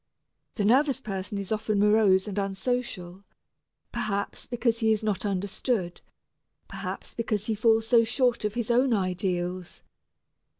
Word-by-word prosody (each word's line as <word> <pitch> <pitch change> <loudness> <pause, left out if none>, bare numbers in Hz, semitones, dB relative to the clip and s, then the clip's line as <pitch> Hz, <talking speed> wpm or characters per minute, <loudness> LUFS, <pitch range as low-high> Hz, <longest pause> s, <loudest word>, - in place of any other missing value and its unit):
The 205 - 0
nervous 270 +4 +3
person 200 -3 -4
is 200 0 -5
often 215 -1 0
morose 205 -2 +4
and 205 0 -2
unsocial 195 -2 -3 0.7
perhaps 200 -1 -3
because 235 -1 0
he 220 -2 +3
is 220 0 +1
not 210 -1 -1
understood, 195 0 -2 0.7
perhaps - - -6
because 215 -3 -2
he 225 - 0
falls 225 +1 +3
so 230 0 +5
short 245 0 +1
of 210 +1 -2
his 240 -1 -1
own 245 0 +3
ideals. 180 -2 -2
210 Hz, 135 wpm, -27 LUFS, 195-230 Hz, 0.7 s, so